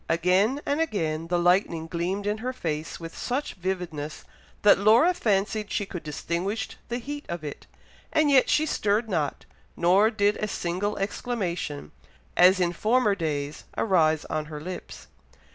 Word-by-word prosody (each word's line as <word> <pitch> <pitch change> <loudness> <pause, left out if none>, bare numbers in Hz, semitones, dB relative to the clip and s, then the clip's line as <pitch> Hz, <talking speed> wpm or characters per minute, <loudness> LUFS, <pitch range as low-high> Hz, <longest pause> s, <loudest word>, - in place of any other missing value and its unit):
Again 185 - +2
and 290 +3 0
again 165 - -1
the 175 +1 +1
lightning 175 -2 +2
gleamed 180 +4 -2
in 210 +1 -1
her 255 +3 -3
face 160 -8 -4
with 165 -1 -8
such 265 +4 -2
vividness, 175 -5 -4 0.4
that 205 -2 +7
Laura 230 - +5
fancied 210 - 0
she 205 - -1
could 180 -3 -7
distinguish 175 +8 -3 0.2
the 240 - -1
heat 290 +4 -6
of 170 -2 -4
it, 145 -2 -7 0.4
and 305 -2 +3
yet 265 -2 +5
she 310 - +3
stirred 215 -5 0
not, 160 -8 -2 0.3
nor 190 +5 +4
did 205 -2 +1
a 215 - -2
single 195 +2 -2
exclamation, 185 - -3 0.4
as 185 +2 +6
in 175 -1 +1
former 215 +3 +2
days, 150 -5 -3
arise 160 -7 +2
on 155 -1 -2
her 150 -1 -7
lips. 180 +4 -8
190 Hz, 155 wpm, -26 LUFS, 165-220 Hz, 0.4 s, that